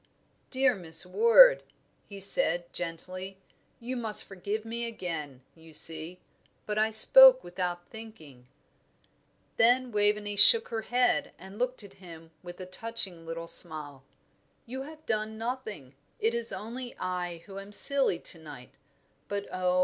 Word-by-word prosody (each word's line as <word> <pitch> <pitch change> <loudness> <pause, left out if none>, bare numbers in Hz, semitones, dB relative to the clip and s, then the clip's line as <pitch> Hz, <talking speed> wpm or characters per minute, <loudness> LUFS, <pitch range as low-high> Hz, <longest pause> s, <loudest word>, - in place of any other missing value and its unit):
"Dear 260 -1 +2
Miss 165 -2 0
Ward," 485 - +6 0.5
he 200 -1 -10
said, 175 -3 -1
gently, 185 +3 -6 0.4
"you 245 +2 -6
must 225 -4 +1
forgive 205 +3 -6
me 235 +1 -4
again, 155 - -7
you 160 -1 -15
see; 165 +3 -2 0.5
but 210 0 -2
I 215 +1 +2
spoke 260 +4 +7
without 175 0 -5
thinking." 160 - -13 1.1
Then 245 +2 +3
Waveney 205 0 0
shook 460 - +7
her 225 -1 -4
head 245 +4 0
and 190 +3 -13
looked 250 -2 -2
at 200 -1 -14
him 165 -2 -13
with 175 0 -11
a 185 - -7
touching 185 -4 -3
little 165 0 -6
smile. 155 -5 +1 0.6
"You 260 +2 -7
have 310 +3 -12
done 220 0 -3
nothing 220 - -6 0.3
it 225 +1 0
is 235 -1 -3
only 240 +3 -7
I 180 -2 -5
who 195 -1 -9
am 195 +1 -12
silly 270 -2 +3
to 170 - -9
night; 145 -5 -12 0.6
but 200 0 -4
oh! 180 0 0
200 Hz, 140 wpm, -28 LUFS, 175-235 Hz, 1.1 s, spoke